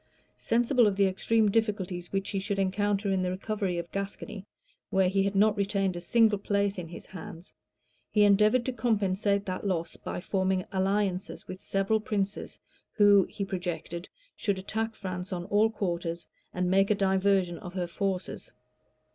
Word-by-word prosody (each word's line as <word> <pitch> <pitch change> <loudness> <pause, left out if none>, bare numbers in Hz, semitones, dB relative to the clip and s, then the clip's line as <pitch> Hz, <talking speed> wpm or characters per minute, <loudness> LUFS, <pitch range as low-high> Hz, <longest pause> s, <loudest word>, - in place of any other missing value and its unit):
Sensible 240 +1 +3
of 200 - +1
the 200 0 +4
extreme 210 +3 +2
difficulties 195 -5 -1
which 195 0 -2
he 195 - -1
should 200 +1 -2
encounter 200 +1 0
in 190 -1 +1
the 180 - 0
recovery 195 -1 -2
of 170 0 -5
Gascony, 200 +1 -5 0.4
where 190 -1 +3
he 195 +1 +2
had 200 +1 0
not 210 +2 +4
retained 195 -2 0
a 175 - -5
single 220 +2 +3
place 200 -1 0
in 170 - -6
his 170 - -10
hands, 175 -1 -10 0.6
he 210 - +4
endeavored 210 +4 +4
to 260 - -1
compensate 205 -3 +1
that 185 -1 -4
loss 170 -3 -2
by - - -5
forming 190 0 0
alliances 195 0 -1
with 185 0 -8
several 195 +3 +1
princes, 205 -1 -3 0.4
who, 205 -2 +6
he 200 - -4
projected, 175 -2 -4 0.3
should 200 -2 -1
attack 220 +4 -3
France 185 0 -5
on 175 -1 -3
all 205 +3 +3
quarters, 170 -5 -3 0.3
and 180 0 -1
make 195 +1 +4
a 210 - +4
diversion 190 -2 +2
of 180 +1 -9
her 180 -2 -1
forces. 185 +2 -3
195 Hz, 165 wpm, -29 LUFS, 185-205 Hz, 0.6 s, who